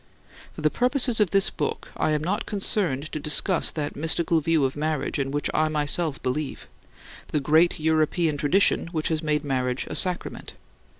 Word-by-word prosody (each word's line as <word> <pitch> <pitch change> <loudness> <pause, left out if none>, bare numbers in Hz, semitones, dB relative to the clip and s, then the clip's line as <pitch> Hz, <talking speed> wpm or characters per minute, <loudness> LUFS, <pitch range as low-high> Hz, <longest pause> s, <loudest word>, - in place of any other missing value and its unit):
For - - -9
the 155 0 +2
purposes 250 -2 +1
of 210 -4 +3
this 195 +1 +2
book - - -3
I - - 0
am 150 -1 0
not 190 +5 -2
concerned 180 -8 0
to 155 - -3
discuss 150 +5 +1
that 150 -2 -4
mystical 160 +2 +2
view 160 -2 +2
of 130 - -2
marriage 150 -2 -2
in 135 -1 -1
which 145 +1 -1
I 155 0 +2
myself 150 0 -1
believe: 135 +3 -3 0.6
the 150 - -1
great 160 +5 +3
European 160 +1 +1
tradition 160 +6 +2
which 160 -2 -2
has 160 -1 -1
made 150 -1 0
marriage 130 -2 -1
a - - -7
sacrament. 180 -2 -2
155 Hz, 175 wpm, -25 LUFS, 145-170 Hz, 0.6 s, of